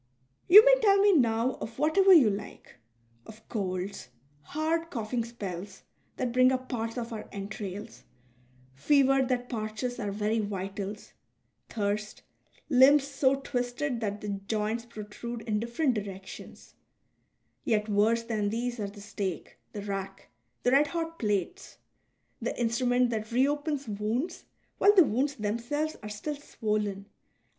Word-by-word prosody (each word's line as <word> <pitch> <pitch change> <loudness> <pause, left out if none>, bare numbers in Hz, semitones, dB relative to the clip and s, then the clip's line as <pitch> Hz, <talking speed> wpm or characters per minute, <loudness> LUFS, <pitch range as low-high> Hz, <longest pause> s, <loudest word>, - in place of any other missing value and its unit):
You 420 +6 +10
may - - +7
tell 400 -3 +5
me 405 0 +5
now 235 -2 +2
of 225 0 -6
whatever 315 +7 +4
you 280 - +7
like 200 -8 -8 0.2
— 115 0 -36
of 220 0 -14
colds, 190 - -4 0.3
hard 320 - -2
coughing 235 -4 -2
spells 200 -5 -7 0.3
that 250 -2 -1
bring 255 +1 +5
up 255 0 -2
parts 230 -2 -3
of 235 -1 -4
our 215 -1 -7
entrails, 200 +1 -7 0.7
fever 270 - +3
that 250 -1 -1
parches 225 +2 -4
our 205 -4 -2
very 210 +2 0
vitals, 200 0 -5 0.6
thirst, 210 -1 -3 0.4
limbs 270 +1 +6
so 275 -1 +2
twisted 245 0 -2
that 205 -1 -3
the 210 - -5
joints 215 +3 -2
protrude 230 +1 -7
in 210 -2 -1
different 240 +5 0
dii'ections; 195 -2 -8 0.9
yet 215 -2 +1
worse 220 +3 +2
than 215 -3 -1
these 240 +2 -3
are 205 -1 -3
the 205 0 -12
stake, 200 -3 -5
the 205 - -6
rack, 195 -1 -5 0.3
the 245 - +3
red 285 +3 +5
hot 330 +1 -4
plates, 210 - -2 0.6
the - - -3
instrument 245 +1 +2
that 220 -1 -4
reopens 290 +3 0
wounds 215 - -3 0.3
while 410 +1 +6
the 370 - +9
wounds 275 +5 0
themselves 240 +8 -2
are 210 - -7
still 210 +9 -4
swollen 210 -7 -2
VOL. 205 - -29
230 Hz, 140 wpm, -29 LUFS, 205-265 Hz, 0.9 s, You